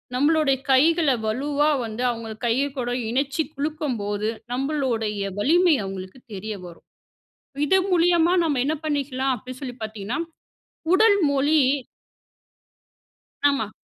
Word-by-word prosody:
நம்மளோட 300 +1 +3 0.2
கைகள 315 +3 +4
வலுவா 285 +6 0 0.2
வந்து 225 +2 -4
அவுங்க 230 -1 -6
கை 240 +4 +2
கூட 245 -1 -2 0.2
இணச்சி 275 +5 0
குலுக்கும்போது, 250 - -2 0.3
நம்பளோடய 235 -8 -1
வலிமை 340 - +4
அவுங்களுக்கு 190 +3 -7 0.2
தெரிய 210 +2 -5
வரும். 170 -1 -13 0.8
இது 380 +6 +4
மூலியமா 345 0 +4
நம்ம 290 -5 0
என்ன 305 +3 0
பண்ணிக்கலாம் 270 -3 -1
அப்டின்சொல்லி 255 +1 -8
பாத்தீங்கன்னா, 215 - -4 0.8
உடல் 410 +1 +5
மொழி 290 +3 +3 1.9
ஆமா. 220 -7 -2
270 Hz, 105 wpm, -23 LUFS, 220-305 Hz, 1.9 s, உடல்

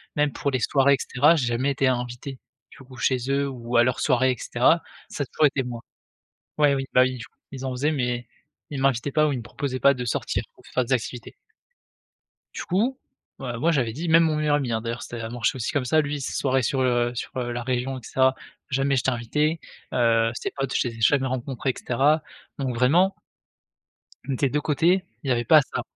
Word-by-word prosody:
même 150 -1 +2
pour 140 - -2
les 130 - 0
soirées 140 +4 +3
et - - -6
cetera, 150 +6 +3
j'ai 130 -6 0
jamais 125 +4 0
été 135 -1 +1
invité 125 +1 -3 0.3
du - - -15
coup 130 -1 -14
chez 120 +4 +1
eux 140 0 +1
ou 120 -2 -5
à 120 - +7
leurs 125 0 0
soirées 130 +1 +3
et 125 - -3
cetera, 130 +11 +2 0.3
ça 145 - -3
a - - -5
toujours 150 - +3
été 135 -1 -1
moi. 120 -1 -6 0.8
Ouais, 145 -2 +4
oui, 135 0 -2
bah, 125 - +7
oui, 130 -1 0
du 115 - -8
coup, - - -28 0.2
ils 135 0 -7
en - - -2
faisaient 145 +5 0
mais 125 -3 -2 0.4
ils 140 -2 -4
m'invitaient 135 0 +1
pas 155 -1 +3
ou - - 0
ils 130 - -2
me - - -6
proposaient 130 +1 -4
pas 140 0 +5
de 125 -1 -5
sortir 115 - -2
pour - - -22
faire 130 - +1
des 130 - -4
activités. 120 +1 -5 1.2
Du - - -4
coup, 225 +9 0 0.4
ouais, 120 -3 -4
moi 165 +4 +2
j'avais 120 -6 0
dit 165 +7 -4
même 165 +1 +6
mon 155 -2 +1
meilleur 150 -1 +1
ami, 135 -5 -2
hein, 110 - 0
d'ailleurs, 115 +1 -5
c'était 120 - -7
l 115 - -5
ça 110 - -4
marchait 120 +1 -1
aussi 120 +3 -3
comme 140 -4 0
ça, 155 +5 +3
lui 145 -1 -3
ses - - -4
soirées 130 -1 +1
sur, 130 +3 0
heu, 120 -1 +1
sur, - - -5
heu, 120 -1 -2
la 120 0 -4
région 130 +1 -2
et - - -10
cetera, 130 0 +2 0.4
jamais 135 +1 +1
j'étais 130 +1 +1
invité, 150 +7 -1 0.3
heu, 115 -1 +3
ses - - -4
potes 135 -2 -3
je 125 - +1
les 115 - -8
ai - - -10
jamais 135 +3 +3
rencontrés 130 +1 -2
et - - -2
cetera, 145 +6 +2 0.4
donc 130 -3 -2
vraiment 175 +11 +3 1.1
des 135 +1 +1
2 150 +3 0
côtés, 175 +5 +2 0.2
il 135 - -5
y - - +3
avait 120 0 0
pas 155 +5 +7
ça. 135 - -4
130 Hz, 235 wpm, -24 LUFS, 120-145 Hz, 1.2 s, à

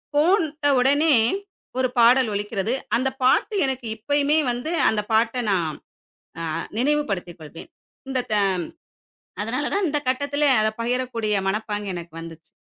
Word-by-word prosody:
போட்ட 310 -2 +2
உடனே 285 +3 +4 0.6
ஒரு 255 - +3
பாடல் 240 0 +5
ஒலிக்கிறது. 205 +2 -2 0.2
அந்த 260 +3 +1
பாட்டு 335 - +3
எனக்கு 260 -3 -3
இப்பயுமே 285 +6 +1
வந்து, 245 +7 -4 0.2
அந்த 215 -1 0
பாட்டை 230 +3 +2
நான் 170 -4 +1 0.7
அ - - -3 0.4
நினைவுபடுத்திக் 235 - -1
கொள்வேன். 155 +1 -11 0.4
இந்த 260 -1 0
த - - +3 1.1
அதனால 250 +7 -2
தான் 400 -1 +1
இந்த 295 0 0
கட்டத்திலே 285 +3 +1
அதை 215 0 +2
பகிரக்கூடிய 235 -3 -1
மனப்பாங்கு 210 0 -2
எனக்கு 170 -1 -8
வந்துச்சு. 165 -1 -11
250 Hz, 130 wpm, -23 LUFS, 210-285 Hz, 1.1 s, பாடல்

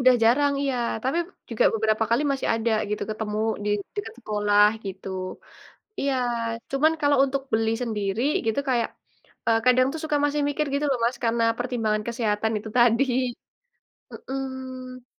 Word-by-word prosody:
Udah 255 0 +6
jarang, 285 +5 +4
iya, 270 -2 0 0.3
tapi 270 +6 +1 0.3
juga 230 - +2
beberapa 220 0 +1
kali 240 +5 +3
masih 270 - -2
ada 225 0 0 0.2
gitu, 210 - -2
ketemu 215 -1 -3 0.3
di - - -1 0.3
dekat 405 - -4
sekolah, 210 -2 +3 0.2
gitu. 190 0 -6 0.9
Iya, 275 -1 +1 0.6
cuman 295 +4 +3
kalau 290 -1 +3
untuk 275 0 -2
beli 220 0 +2
sendiri 210 -1 -2 0.2
gitu 225 +5 +1
kayak, 240 -3 +2 0.6
eee, 225 -1 +4
kadang 255 +1 +5
tuh 320 - -5
suka 305 -1 0
masih 290 +1 +1
mikir 300 +1 -1
gitu 285 - 0
loh 260 - +1
Mas 240 +2 +1
karena 230 0 +2
pertimbangan 225 -4 -1
kesehatan 220 -2 0
itu 220 +1 -8
tadi. 240 +2 +5 1.1
Mhm. 260 -1 -6
240 Hz, 150 wpm, -25 LUFS, 220-270 Hz, 1.1 s, Udah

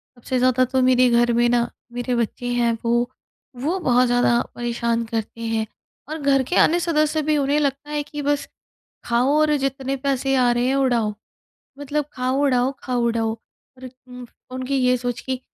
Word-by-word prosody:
सबसे 255 +2 -3
ज़्यादा 255 0 +3
तो 260 +1 0
मेरे 255 -1 +4
घर 240 0 +3
में 240 +1 +3
ना 240 -1 +1 0.2
मेरे 245 0 -2
बच्चे 235 +1 -2
हैं। 235 -1 +1
वो, 240 +1 +1 0.5
वो 305 +10 -2
बहुत 250 -5 +3
ज़्यादा 240 0 +3
परेशान 235 -1 -1
करते 225 0 -5
हैं, 225 -1 -1 0.4
और 315 - -4
घर 275 -1 +3
के 355 - -3
अन्य 345 +2 +4
सदस्य 310 -2 +1
भी। 305 0 +1
उन्हें 285 +1 +1
लगता 280 0 -2
है 295 0 -1
कि 295 0 -7
बस, 290 0 -1 0.6
खाओ 245 +4 +2
और 305 -1 +3
जितने 270 0 -2
पैसे 270 0 0
आ 250 -2 +3
रहे 240 +1 +1
हैं 270 - +1
उड़ाओ। 240 -6 +1 0.7
मतलब 290 +1 -2
खाओ 255 +2 -1
उड़ाओ 255 -1 +2
खाओ 250 -2 -1
उड़ाओ, 225 -1 0 0.4
और 255 0 -9 0.2
उम, 250 0 -9 0.3
उनकी 255 +2 -3
ये 250 -1 +3
सोच 245 -1 -3
कि 260 -1 -3
255 Hz, 180 wpm, -22 LUFS, 240-275 Hz, 0.7 s, मेरे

